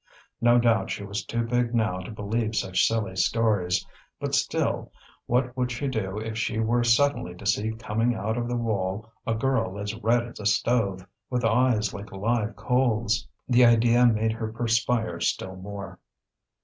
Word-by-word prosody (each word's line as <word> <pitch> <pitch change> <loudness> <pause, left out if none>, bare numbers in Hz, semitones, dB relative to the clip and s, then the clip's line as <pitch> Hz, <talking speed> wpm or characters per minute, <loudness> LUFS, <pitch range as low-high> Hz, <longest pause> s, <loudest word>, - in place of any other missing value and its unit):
No 120 +1 +5
doubt 115 -1 +2
she - - -4
was 100 +2 -4
too 115 0 -2
big 120 0 0
now 110 -5 +1
to 95 - -8
believe 110 +1 -2
such 95 -3 +2
silly 105 -4 -1
stories; 95 -2 +1 0.3
but - - -3
still, - - 0 0.4
what 125 +1 +1
would 125 -1 -1
she 125 +4 -3
do 105 -6 -2
if 110 0 -4
she 110 0 -1
were 115 +2 +2
suddenly 120 -5 +2
to 95 - -12
see 105 +3 +1
coming 115 +2 -1
out 110 0 -2
of 120 0 -2
the 120 - -2
wall 105 -3 -2 0.2
a 115 - +1
girl 115 -5 0
as 100 +1 -3
red 115 +1 +1
as 120 - -11
a 105 - -1
stove, 105 -4 +1 0.2
with 125 -2 -1
eyes 115 -2 +2
like 100 0 -8
live 110 +3 -1
coals? 115 - +1 0.2
The 125 0 +5
idea 120 +1 +5
made 110 -1 +2
her 110 -1 -4
perspire 115 0 0
still 95 0 -1
more. 100 +1 -8
115 Hz, 175 wpm, -26 LUFS, 105-120 Hz, 0.4 s, No